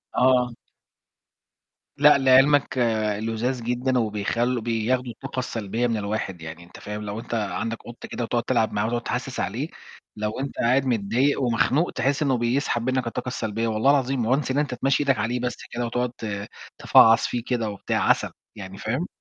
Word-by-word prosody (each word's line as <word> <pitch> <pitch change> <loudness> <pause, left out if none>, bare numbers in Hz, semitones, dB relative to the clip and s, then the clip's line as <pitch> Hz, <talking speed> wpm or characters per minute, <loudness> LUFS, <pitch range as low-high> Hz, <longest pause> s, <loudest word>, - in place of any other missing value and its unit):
آه. 125 -1 +3 1.4
لأ، 150 0 +7
لعلمك، 135 +1 +4 0.4
لُذاذ 115 +2 -2
جدًا 125 +2 0
وبيخل 115 +3 -1
بياخدوا 120 +2 -1
الطاقة 125 +3 -6
السلبية 115 0 -2
من 115 -2 -1
الواحد 100 -4 -3
يعني، 80 +2 -8
أنت 85 - -14
فاهم؟ 105 0 -6
لو 105 +1 -5
أنت 120 - -8
عندك 115 +1 -2
قط 120 0 -10
كده 120 - -4
وتقعد 120 0 -1
تلعب 115 -4 +1
معاه 105 +1 0
وتقعد 120 +1 -1
تحسس - - -4
عليه، - - -2 0.5
لو 105 +3 -3
أنت 140 0 -5
قاعد 130 +3 +3
متضايق 120 +5 +1
ومخنوق 130 +7 +2
تحس 140 +4 0
إنه 135 -3 +2
بيسحب 120 0 0
منك 130 -2 0
الطاقة 125 +2 -4
السلبية، 115 -2 -2
والله 110 +5 +3
العظيم. 135 -4 +1
once 140 -2 -2
إن 135 - -1
أنت 145 -4 0
تمشّي 135 +3 +1
إيدك 135 -4 +2
عليه 120 +3 -1
بس 125 0 -2 0.2
كده 120 0 -2
وتقعد 125 +1 -1
ت 100 -2 -5 0.3
تفعص 115 0 +6
فيه 120 -2 -3
كده 115 -4 0
وبتاع، 100 - -1
عسل - - +2 0.2
يعني، 95 -1 -9
فاهم؟ 130 +11 -2
120 Hz, 170 wpm, -24 LUFS, 110-130 Hz, 1.4 s, لأ